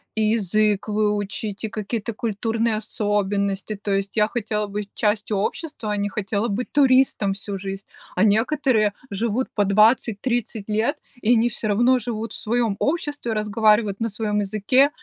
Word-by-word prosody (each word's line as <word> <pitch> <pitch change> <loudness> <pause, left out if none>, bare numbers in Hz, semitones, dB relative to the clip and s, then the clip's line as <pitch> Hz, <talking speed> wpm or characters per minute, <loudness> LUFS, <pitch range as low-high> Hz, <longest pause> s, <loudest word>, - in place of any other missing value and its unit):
и 220 - 0
язык 215 -1 +1
выучить, 210 0 -1
и 220 - -1
какие-то 220 +2 -3
культурные 225 +1 -1
особенности, 205 -1 -1
то 205 0 -4
есть 195 +2 -2
я 210 -1 +4
хотела 215 -2 -2
быть 205 0 -5
частью 210 -1 0
общества, 220 - -3
а 210 - 0
не 205 0 -1
хотела 205 +3 -2
быть 230 +5 -3
туристом 260 -7 +4
всю 200 0 -4
жизнь. 195 +1 -6 0.3
А 185 - +4
некоторые 225 0 +2 0.2
живут 230 +5 -1
по 205 - +3
20-30 220 +1 +2
лет, 220 +7 0 0.2
и 230 +3 +4
они 230 +2 +3
всё 220 -1 -3
равно 240 +5 +4
живут 225 -2 -4
в - - -5
своем 230 -2 0
обществе, 290 -5 -1
разговаривают 215 -1 +2
на 230 - 0
своем 210 0 -1
языке, 215 +7 +3
215 Hz, 155 wpm, -23 LUFS, 205-230 Hz, 0.3 s, я